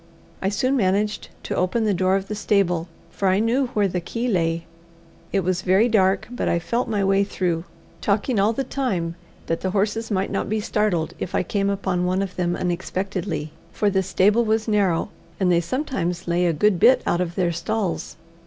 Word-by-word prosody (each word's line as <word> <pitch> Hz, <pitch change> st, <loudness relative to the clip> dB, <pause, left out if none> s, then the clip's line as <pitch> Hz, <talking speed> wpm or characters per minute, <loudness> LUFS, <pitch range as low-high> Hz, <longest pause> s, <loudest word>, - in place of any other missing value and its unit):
I 195 Hz, -, +1 dB
soon 255 Hz, +7 st, +1 dB
managed 205 Hz, -1 st, 0 dB
to -, -, -3 dB
open 185 Hz, +6 st, +1 dB
the 210 Hz, -2 st, +2 dB
door 185 Hz, +1 st, +2 dB
of 195 Hz, 0 st, -2 dB
the -, -, -4 dB
stable, 195 Hz, -5 st, +1 dB, 0.2 s
for 195 Hz, -, -1 dB
I 185 Hz, 0 st, +4 dB
knew 235 Hz, +5 st, +2 dB
where 205 Hz, -2 st, +3 dB
the 180 Hz, -1 st, -2 dB
key 230 Hz, +7 st, -3 dB
lay. 165 Hz, -5 st, 0 dB, 0.7 s
It 195 Hz, -, +2 dB
was 185 Hz, 0 st, 0 dB
very 190 Hz, +5 st, +4 dB
dark, 195 Hz, -4 st, +2 dB
but 245 Hz, -, -1 dB
I -, -, +2 dB
felt 235 Hz, +9 st, -1 dB
my 205 Hz, -3 st, 0 dB
way 195 Hz, +1 st, +3 dB
through, 175 Hz, -4 st, -2 dB, 0.4 s
talking 210 Hz, +3 st, +1 dB
all 205 Hz, +3 st, +4 dB
the 270 Hz, +4 st, -2 dB
time 200 Hz, -12 st, -2 dB, 0.3 s
that 165 Hz, -, -2 dB
the 190 Hz, -, -1 dB
horses 210 Hz, +3 st, 0 dB
might 195 Hz, -2 st, -1 dB
not -, -, -2 dB
be 215 Hz, +1 st, 0 dB
startled 205 Hz, -6 st, 0 dB
if 180 Hz, -, -4 dB
I -, -, +2 dB
came 200 Hz, +2 st, 0 dB
upon 190 Hz, -3 st, -1 dB
one 185 Hz, +2 st, +1 dB
of 190 Hz, -2 st, -6 dB
them 175 Hz, -1 st, 0 dB
unexpectedly, 180 Hz, -3 st, -3 dB, 0.2 s
for 205 Hz, -1 st, +1 dB
the 190 Hz, 0 st, +2 dB
stable 200 Hz, +4 st, +3 dB
was 220 Hz, 0 st, 0 dB
narrow, 200 Hz, -5 st, +1 dB, 0.3 s
and 185 Hz, -2 st, +3 dB
they 170 Hz, -1 st, +4 dB
sometimes 185 Hz, -, -2 dB
lay 175 Hz, +1 st, +2 dB
a -, -, +3 dB
good 190 Hz, +3 st, +2 dB
bit 245 Hz, +5 st, +5 dB
out 175 Hz, -, +1 dB
of 175 Hz, -1 st, -3 dB
their 175 Hz, -2 st, +1 dB
stalls. 185 Hz, +3 st, -2 dB
195 Hz, 200 wpm, -23 LUFS, 180-215 Hz, 0.7 s, bit